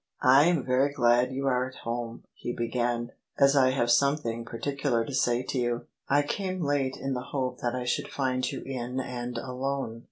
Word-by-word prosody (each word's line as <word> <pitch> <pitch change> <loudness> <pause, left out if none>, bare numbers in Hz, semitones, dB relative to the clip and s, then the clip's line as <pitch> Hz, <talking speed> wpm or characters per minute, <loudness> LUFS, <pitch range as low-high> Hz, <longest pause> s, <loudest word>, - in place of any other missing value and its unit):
" - - -34 0.2
I 145 - +6
am 170 -6 +2
very 130 +2 +2
glad 120 -2 +3
you 135 +1 -3
are 125 -1 +2
at 130 - -14
home," 115 0 -4
he 120 - -5
began, 120 0 -1
" - - -45
as 140 0 +6
I 130 -2 +5
have 120 -2 +1
something 120 -3 +2
particular 125 0 -1
to 135 - -7
say 120 -1 +2
to 130 - -2
you. 120 0 -1 0.2
I 145 +1 +4
came 185 +4 -3
late 140 -2 0
in 135 0 -3
the 125 - -2
hope 130 -2 -2
that 120 0 -1
I 125 - -2
should 125 - -1
find 130 -2 -1
you - - -6
in 125 -1 -3
and 125 -1 -4
alone." 130 -2 -3
130 Hz, 210 wpm, -28 LUFS, 120-140 Hz, 0.2 s, I